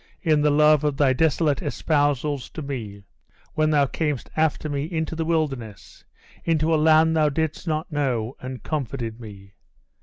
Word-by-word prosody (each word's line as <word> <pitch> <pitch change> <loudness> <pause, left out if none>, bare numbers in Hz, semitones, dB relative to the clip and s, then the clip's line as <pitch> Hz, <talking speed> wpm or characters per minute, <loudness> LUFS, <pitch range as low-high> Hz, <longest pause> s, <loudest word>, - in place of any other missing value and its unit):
in 155 -4 +3
the 150 - +3
love 150 0 +4
of 145 -2 0
thy 140 -3 +3
desolate 155 0 +1
espousals 145 -2 0
to 155 - -7
me! 110 -8 -6 0.5
when 155 0 +1
thou 145 -2 +3
camest 150 -1 -3
after 155 -1 0
me 145 -1 -2
into 160 -1 -3
the 165 - -2
wilderness, 140 -10 -3 0.4
into 160 0 +1
a - - +5
land 160 +1 +4
thou 155 -1 +3
didst 160 +3 -3
not 155 +1 -2
know, 130 -5 -1
and 130 0 -7
comforted 120 -6 -4
me! 100 -4 -12
150 Hz, 160 wpm, -23 LUFS, 130-155 Hz, 0.5 s, a